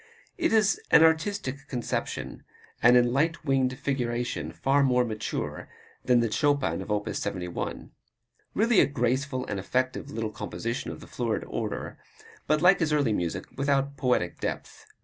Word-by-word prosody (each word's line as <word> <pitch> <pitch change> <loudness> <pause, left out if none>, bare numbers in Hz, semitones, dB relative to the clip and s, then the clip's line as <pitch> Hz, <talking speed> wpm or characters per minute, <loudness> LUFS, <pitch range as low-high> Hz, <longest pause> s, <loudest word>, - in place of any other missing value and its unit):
It 335 -2 0
is 220 -1 +3
an 160 - +7
artistic 160 -3 +1
conception, 120 -3 -4 0.4
and 125 +1 +7
in 120 0 +3
"light 160 +4 0
winged 130 -2 +1
figuration" 120 -3 -2
far 140 +1 +2
more 125 -2 +3
mature 110 -2 -4 0.3
than 125 -2 +4
the 115 -2 0
Chopin 140 - +1
of 95 - -8
op. 105 0 -1
71. 90 -3 -4 0.6
Really 225 0 +4
a - - +5
graceful 130 0 -1
and 100 -2 -3
effective 130 +7 -1
little 110 -1 -3
composition 115 +2 -4
of - - -8
the - - -11
florid 115 -3 -2
order, - - -4 0.5
but 155 +2 +2
like 180 +2 +6
his 160 -3 +1
early 145 -7 +2
music 90 -1 -2
without 140 0 0
poetic 125 -10 0
depth. - - -5
130 Hz, 150 wpm, -27 LUFS, 115-145 Hz, 0.6 s, an